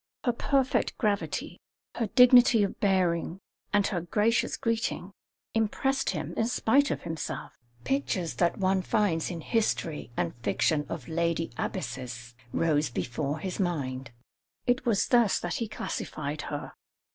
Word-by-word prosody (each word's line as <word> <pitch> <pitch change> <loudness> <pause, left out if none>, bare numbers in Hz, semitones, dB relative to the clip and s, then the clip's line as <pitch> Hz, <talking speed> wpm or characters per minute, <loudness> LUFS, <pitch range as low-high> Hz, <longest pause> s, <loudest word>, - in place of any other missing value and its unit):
Her 245 - +2
perfect 265 +2 +1
gravity, 210 -3 -1 0.3
her 230 - -1
dignity 245 -1 +7
of 200 - -3
bearing, 185 -3 +1 0.3
and 205 -1 +3
her 180 -5 -1
gracious 210 +7 +1
greeting, 230 -5 -1 0.4
impressed 270 +5 +1
him - - -3
in 225 - +1
spite 270 +4 +3
of - - -3
himself. 165 -2 -4 0.3
Pictures 185 - -1
that 170 - +2
one 190 -1 +2
finds 185 -5 +1
in 170 -3 -5
history 190 -7 -1
and 85 - 0
fiction 135 +7 +1
of 140 -8 -5
lady 165 0 0
abbesses 120 -2 -5 0.2
rose 155 -1 +2
before 140 +5 -2
his 185 +5 -5
mind; 140 -8 -2 0.6
it 245 +2 +1
was 215 -4 +2
thus 240 -5 +4
that 175 - -3
he 230 - -2
classified 150 -7 -4
her. 145 0 -5
185 Hz, 135 wpm, -28 LUFS, 155-225 Hz, 0.6 s, dignity